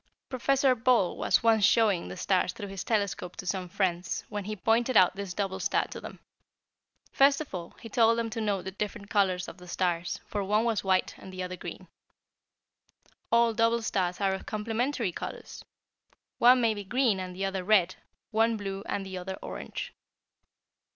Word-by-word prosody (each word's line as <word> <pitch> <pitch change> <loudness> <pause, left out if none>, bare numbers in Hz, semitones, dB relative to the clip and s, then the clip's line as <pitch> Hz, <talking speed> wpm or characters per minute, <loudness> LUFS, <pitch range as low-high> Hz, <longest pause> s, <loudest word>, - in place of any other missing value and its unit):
"Professor 270 +1 +2
Ball 235 -6 +2
was - - +2
once 225 -2 +4
showing 210 - +3
the 95 - -7
stars 185 -2 +1
through 205 - -7
his 195 -1 -5
telescope 200 -5 -1
to - - -8
some 180 0 -2
friends, 180 -1 -1
when 205 -2 -4
he 215 +1 -4
pointed 230 +5 +2
out 185 0 +5
this 200 -2 -5
double 195 -2 -2
star - - +1
to - - -8
them. - - -9 0.9
First 275 0 +4
of 305 -7 -7
all, 170 -2 -6
he - - -9
told 230 0 +3
them 230 -1 -2
to 225 - -3
note 205 -3 -1
the 190 - -5
different 200 +1 -5
colors 185 -3 +2
of - - -9
the 180 - -13
stars, 175 -1 -1
for 205 -1 -3
one 210 +3 +2
was 230 -3 0
white, 190 -1 +1
the 185 -1 -6
other 180 0 -5
green. - - -8 1.4
All 235 0 +4
double 230 +1 +2
stars 180 -4 -1
are 195 -1 +1
of 190 - -6
complementary 225 +1 -1
colors. - - -7 0.8
One 250 +2 +7
may 225 -2 +3
be 205 -1 -6
green 235 -1 +1
and 185 -1 -6
the 195 +1 -2
other 190 -1 -2
red, 185 -2 +4 0.4
one 225 +1 +2
blue 195 -1 -5
and 195 - -2
the 190 -1 -5
other 190 +1 -5
orange. - - -6
200 Hz, 185 wpm, -28 LUFS, 185-230 Hz, 1.4 s, One